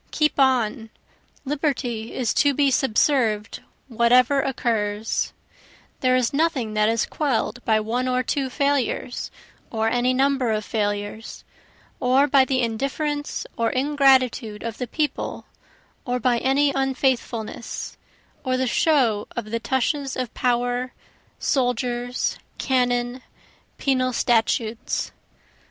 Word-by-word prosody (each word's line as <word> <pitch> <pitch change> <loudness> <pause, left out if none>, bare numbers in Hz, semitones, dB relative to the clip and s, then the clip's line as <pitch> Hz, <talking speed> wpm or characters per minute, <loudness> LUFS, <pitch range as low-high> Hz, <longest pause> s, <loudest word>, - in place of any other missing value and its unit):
Keep 300 -1 0
on 245 -4 +2 0.6
Liberty 260 -6 -2
is 245 -4 0
to 285 -1 +3
be 280 -1 +3
subserv'd 230 -4 +1 0.3
whatever 250 +3 +4
occurs; 225 -5 -1 0.7
That 255 -1 +3
is 250 0 0
nothing 280 -8 0
that 215 0 +3
is 230 0 +1
quell'd 245 -5 -2
by 220 -1 +3
one 240 +4 -1
or 255 0 +1
two 270 +1 -1
failures, 280 -2 -1 0.4
or 225 -1 0
any 245 +2 +1
number 265 -3 +2
of 215 -1 -1
failures, 205 0 -3 0.6
Or 260 +3 +4
by 275 -2 +4
the 260 -2 0
indifference 275 +6 -2
or 230 -1 +1
ingratitude 260 -5 +2
of 230 -1 -5
the 250 - -3
people, 300 +4 -3 0.6
or 250 -1 -1
by 245 0 +2
any 280 +3 +2
unfaithfulness, 260 -4 -2 0.5
Or 255 -2 0
the 260 - 0
show 245 -6 +2
of 215 -3 -5
the 230 - -1
tushes 265 +2 -1
of 255 -3 -3
power, 245 +1 0 0.4
soldiers, 245 -2 -1 0.2
cannon, 245 -1 0 0.6
penal 255 -2 +1
statutes. 225 -1 0
250 Hz, 115 wpm, -23 LUFS, 230-270 Hz, 0.7 s, whatever